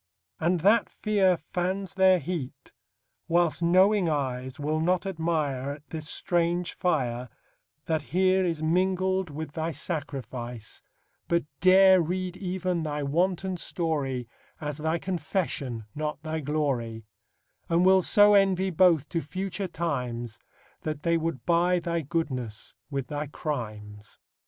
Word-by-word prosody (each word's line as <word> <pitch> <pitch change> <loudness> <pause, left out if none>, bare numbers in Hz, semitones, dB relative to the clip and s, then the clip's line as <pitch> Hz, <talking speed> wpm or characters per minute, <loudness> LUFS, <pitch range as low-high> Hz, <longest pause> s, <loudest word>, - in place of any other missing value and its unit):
And 170 +1 +1
that 210 +6 +4
fear 195 -4 +2
fans 185 +4 -3
their 190 -1 +5
heat; 150 -7 -6 0.5
whilst 170 -1 +2
knowing 185 +2 +4
eyes 130 -2 -2
Will 155 +2 -1
not 180 +3 +1
admire 155 -7 -1
At 145 +1 -14
this 155 -1 -4
strange 175 0 0
fire 125 -8 -1 0.6
That 160 -1 0
here 185 +4 +2
is 165 -3 -1
mingled 185 +2 +1
with 150 +1 -6
thy 160 +2 -2
sacrifice, 130 - -5 0.5
But 170 0 +2 0.2
dare 190 0 +7
read 180 +2 -2
even 185 -2 -2
thy 150 -2 -2
wanton 180 +5 0
story 145 -9 -2 0.3
As 150 -1 -4
thy 160 +2 0
confession, 160 - -2
not 150 0 -4
thy 160 0 -2
glory; 130 -7 -2 0.6
And 170 +2 +3
will 190 0 +6
so 205 +2 +6
envy 190 -1 +3
both 170 -4 +4
to 165 - -1
future 190 +5 -4
times, 125 -10 -3 0.4
That 155 -2 -4
they 170 0 +2
would 165 -4 -2
buy 175 +1 +3
thy 170 -1 -1
goodness 130 -8 -3 0.2
with 140 -3 -3
thy 150 +1 -4
crimes. 105 -9 -6
165 Hz, 130 wpm, -27 LUFS, 145-185 Hz, 0.6 s, dare